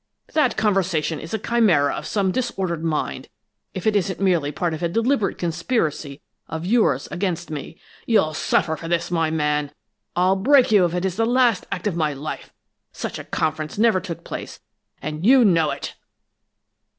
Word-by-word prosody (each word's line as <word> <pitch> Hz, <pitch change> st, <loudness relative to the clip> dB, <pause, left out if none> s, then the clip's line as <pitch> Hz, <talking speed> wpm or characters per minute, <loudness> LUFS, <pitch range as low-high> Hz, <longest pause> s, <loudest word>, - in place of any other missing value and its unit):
That 300 Hz, -5 st, +2 dB
conversation 185 Hz, -7 st, +1 dB
is 160 Hz, -, -9 dB
a 220 Hz, -, 0 dB
chimera 200 Hz, -11 st, +2 dB
of -, -, -5 dB
some 195 Hz, -3 st, +1 dB
disordered 185 Hz, -9 st, -2 dB
mind, 155 Hz, -5 st, -2 dB, 0.5 s
if 185 Hz, -, -5 dB
it 215 Hz, -1 st, +2 dB
isn't 190 Hz, -1 st, 0 dB
merely 175 Hz, -7 st, +2 dB
part 170 Hz, +2 st, -2 dB
of 160 Hz, -, -5 dB
a 170 Hz, -, 0 dB
deliberate 230 Hz, +1 st, +1 dB
conspiracy 165 Hz, -, -2 dB, 0.3 s
of 160 Hz, +2 st, -5 dB
yours 185 Hz, -, +2 dB
against 175 Hz, -3 st, -2 dB
me! 155 Hz, +2 st, -6 dB, 0.3 s
You'll 185 Hz, -9 st, +3 dB
suffer 160 Hz, +1 st, +1 dB
for 165 Hz, -, -8 dB
this, 170 Hz, +1 st, -1 dB
my 165 Hz, -2 st, +1 dB
man! 150 Hz, -2 st, 0 dB, 0.4 s
I'll 185 Hz, +2 st, +3 dB
break 255 Hz, +5 st, +4 dB
you 200 Hz, -4 st, +6 dB
if 175 Hz, 0 st, -2 dB
it 180 Hz, +1 st, -1 dB
is 190 Hz, 0 st, -2 dB
the 225 Hz, -, +2 dB
last 245 Hz, -4 st, +2 dB
act 180 Hz, -, -4 dB
of 205 Hz, -5 st, 0 dB
my 155 Hz, -3 st, 0 dB
life! 145 Hz, +3 st, -6 dB, 0.4 s
Such -, -, -5 dB
a -, -, -6 dB
conference 155 Hz, +1 st, -2 dB
never 220 Hz, -3 st, +4 dB
took 175 Hz, -3 st, -7 dB
place, -, -, -7 dB, 0.4 s
and 155 Hz, +1 st, -4 dB
you 250 Hz, +3 st, +6 dB
know 165 Hz, -6 st, +3 dB
it!" -, -, -5 dB
175 Hz, 175 wpm, -22 LUFS, 155-210 Hz, 0.5 s, you